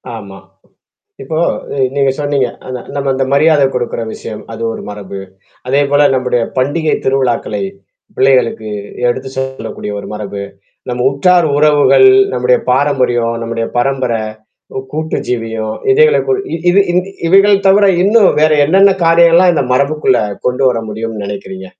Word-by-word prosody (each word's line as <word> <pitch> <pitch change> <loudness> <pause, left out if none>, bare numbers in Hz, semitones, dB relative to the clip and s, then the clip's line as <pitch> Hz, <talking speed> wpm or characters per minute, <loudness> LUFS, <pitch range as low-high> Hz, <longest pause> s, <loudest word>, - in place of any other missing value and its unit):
ஆமா. 100 -3 -10 0.9
இப்போ 155 +4 -4 0.4
அ - - -4 0.2
நீங்க 135 -1 +2
சொன்னீங்க. 145 -4 0 0.2
அந்த 130 -1 -6 0.2
நம்ம 140 -1 -2
அந்த 135 0 0
மரியாதை 150 0 +4
கொடுக்குற 120 -1 -3
விஷயம். 110 - -8
அது 115 +1 -7
ஒரு - - -8
மரபு. 100 -1 -8 0.5
அதேபோல 145 +1 +2
நம்முடைய 125 -2 0 0.2
பண்டிகை 155 +4 0
திருவிழாக்களை 120 -6 -1 0.5
பிள்ளைகளுக்கு 125 -4 +1 0.4
எடுத்து 130 +2 -3
சொல்லக்கூடிய 130 -5 -5
ஒரு - - -10
மரபு. 100 -1 -6 0.5
நம்ம 125 0 -2
உற்றார் 175 +4 +2
உறவுகள், 150 - +4 0.3
நம்முடைய - - +2
பாரம்பரியம், 125 -4 +1
நம்முடைய 115 0 -3
பரம்பரை 125 -3 -1 0.6
உ - - -1
கூட்டு 155 +1 -3
ஜீவியும் 115 -2 -3 0.2
இதைகளை 460 +2 +4
கு 415 - +1 0.2
இ - - -1
இது 200 +3 +4
இந் 180 - +2 0.3
இவைகள் 195 +2 +4
தவிர 200 +1 +5 0.2
இன்னும் 205 0 +4
வேற 155 0 +4
என்னென்ன 195 +5 +4
காரியங்கள்லாம் 170 +2 +5
இந்த 160 - 0
மரபுக்குள்ள 140 -1 +1 0.3
கொண்டு 125 +2 0
வர 115 -2 -2
முடியும்ன்னு 110 -1 -5
நெனைக்கிறீங்க? 95 -2 -7
135 Hz, 140 wpm, -13 LUFS, 115-155 Hz, 0.9 s, தவிர